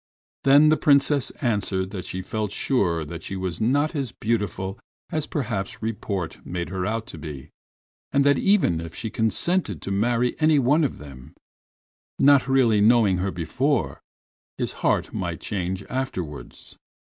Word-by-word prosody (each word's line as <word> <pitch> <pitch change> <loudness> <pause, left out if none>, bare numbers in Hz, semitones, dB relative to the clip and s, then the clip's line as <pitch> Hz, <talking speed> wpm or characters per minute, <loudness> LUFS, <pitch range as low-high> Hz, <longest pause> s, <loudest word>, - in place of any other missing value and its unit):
Then 145 +3 +7
the 155 - +4
Princess 140 -1 +3
answered 100 -5 0
that 95 -3 -6
she 95 0 -5
felt 105 -1 -3
sure 85 - 0
that 85 +3 -7
she 95 - -6
was 95 -1 -4
not 145 +8 +1
as 135 -5 -2
beautiful 100 -5 -2 0.3
as 155 -2 -1
perhaps 110 -9 -3
report 100 -6 -4
made 85 -1 -4
her 95 -1 -2
out 115 +1 -2
to 80 - -10
be, 75 -4 -8 0.6
and 140 - +3
that 140 -1 +4
even 195 - +3
if 85 -1 -8
she 110 - -5
consented 170 +13 +1
to 95 - -4
marry 120 +4 +1
any 155 -1 +4
one 145 +5 +3
of 140 - -1
them, 70 -1 -12 0.8
not 140 -1 +5
really 125 -6 +3
knowing 110 -3 +4
her 95 +2 -1
before, 105 - -1 0.6
his - - -2
heart - - +1
might - - -3
change 95 -1 -3
afterwards. 95 - -6
110 Hz, 155 wpm, -24 LUFS, 90-135 Hz, 0.8 s, Then